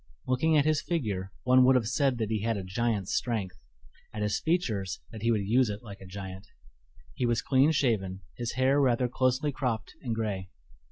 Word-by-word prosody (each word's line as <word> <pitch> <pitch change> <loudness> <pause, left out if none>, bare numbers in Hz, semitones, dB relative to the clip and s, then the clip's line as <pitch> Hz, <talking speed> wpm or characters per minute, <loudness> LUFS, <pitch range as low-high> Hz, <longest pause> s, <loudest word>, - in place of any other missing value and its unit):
Looking 150 +5 +2
at 145 - +3
his 155 -1 +2
figure, 105 - -2
one 130 0 +6
would 130 +1 +6
have 125 -3 +2
said 130 +1 +1
that 110 -2 -2
he 110 -2 0
had 115 0 0
a 95 - -4
giant's 100 +1 -1
strength; 115 -6 -2 0.5
at 105 0 -4
his 105 -1 0
features, 110 - -1
that 110 - -8
he 115 - +1
would 105 -4 +1
use 125 +2 +3
it 105 +3 -5
like 100 -3 -10
a 95 - -10
giant. 95 +1 -8 0.7
He 120 - -1
was 120 -1 +1
clean 135 +2 +4
shaven, 105 -10 0
his 120 -1 -3
hair 130 +3 +3
rather 125 -2 +2
closely 130 +4 +1
cropped 120 -5 -3
and 120 -5 -2
gray. 100 -4 -3
115 Hz, 200 wpm, -29 LUFS, 100-130 Hz, 0.7 s, one